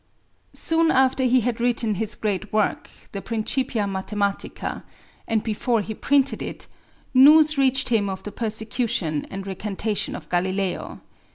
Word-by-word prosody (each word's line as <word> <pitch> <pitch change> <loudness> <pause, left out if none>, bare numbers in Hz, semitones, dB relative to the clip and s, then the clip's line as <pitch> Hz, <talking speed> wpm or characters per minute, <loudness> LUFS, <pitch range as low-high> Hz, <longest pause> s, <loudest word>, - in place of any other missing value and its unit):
Soon 325 0 +2
after 265 -2 +3
he 255 0 +4
had 235 0 -2
written 235 -2 +1
his 215 +2 -3
great 210 -1 -3
work, 215 -1 0 0.2
the 200 - -5
Principia 230 +1 -1
Mathematica, 200 +1 -3 0.5
and 220 -2 0
before 225 +1 0
he 220 +2 -5
printed 275 +4 +1
it, - - -5 0.5
news 305 +4 +7
reached 265 -1 +2
him 215 -4 +2
of 190 0 -5
the 210 - -6
persecution 220 - -2
and 195 0 -6
recantation 205 +2 -3
of - - -9
Galileo. 185 +1 -2
220 Hz, 140 wpm, -23 LUFS, 200-255 Hz, 0.5 s, news